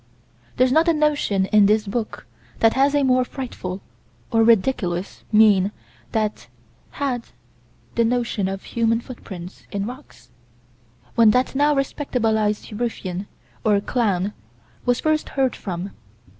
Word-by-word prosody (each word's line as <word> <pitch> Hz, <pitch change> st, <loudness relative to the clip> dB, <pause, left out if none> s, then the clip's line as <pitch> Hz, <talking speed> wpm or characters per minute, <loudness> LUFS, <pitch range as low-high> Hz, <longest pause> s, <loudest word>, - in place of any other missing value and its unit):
There's 255 Hz, 0 st, +4 dB
not 320 Hz, +5 st, +4 dB
a 335 Hz, -, +5 dB
notion 295 Hz, -11 st, +1 dB
in 205 Hz, 0 st, +5 dB
this 215 Hz, +1 st, +2 dB
book 215 Hz, +2 st, -4 dB, 0.3 s
that 225 Hz, 0 st, +4 dB
has 275 Hz, +2 st, +3 dB
a 285 Hz, -, +3 dB
more 255 Hz, -1 st, +3 dB
frightful, 240 Hz, -8 st, -6 dB, 0.5 s
or 225 Hz, -1 st, +4 dB
ridiculous, 200 Hz, -5 st, +1 dB
mien 210 Hz, -3 st, +5 dB, 0.4 s
than 215 Hz, -2 st, +1 dB, 0.6 s
had 255 Hz, -4 st, -2 dB, 0.7 s
the 235 Hz, -, +2 dB
notion 230 Hz, -4 st, 0 dB
of 195 Hz, 0 st, -4 dB
human 230 Hz, -1 st, +1 dB
footprints 190 Hz, -7 st, -10 dB
in 200 Hz, 0 st, -2 dB
rocks, 165 Hz, -, -11 dB, 0.8 s
when 230 Hz, -2 st, +6 dB
that 255 Hz, -, 0 dB
now 290 Hz, +2 st, +3 dB
respectabilized 225 Hz, -7 st, 0 dB
ruffian, 200 Hz, -5 st, -3 dB, 0.4 s
or 210 Hz, -2 st, +3 dB
clown, 205 Hz, -3 st, 0 dB, 0.5 s
was 245 Hz, 0 st, +3 dB
first 310 Hz, 0 st, 0 dB
heard 265 Hz, -2 st, +2 dB
from. 185 Hz, 0 st, -5 dB
225 Hz, 130 wpm, -22 LUFS, 200-255 Hz, 0.8 s, when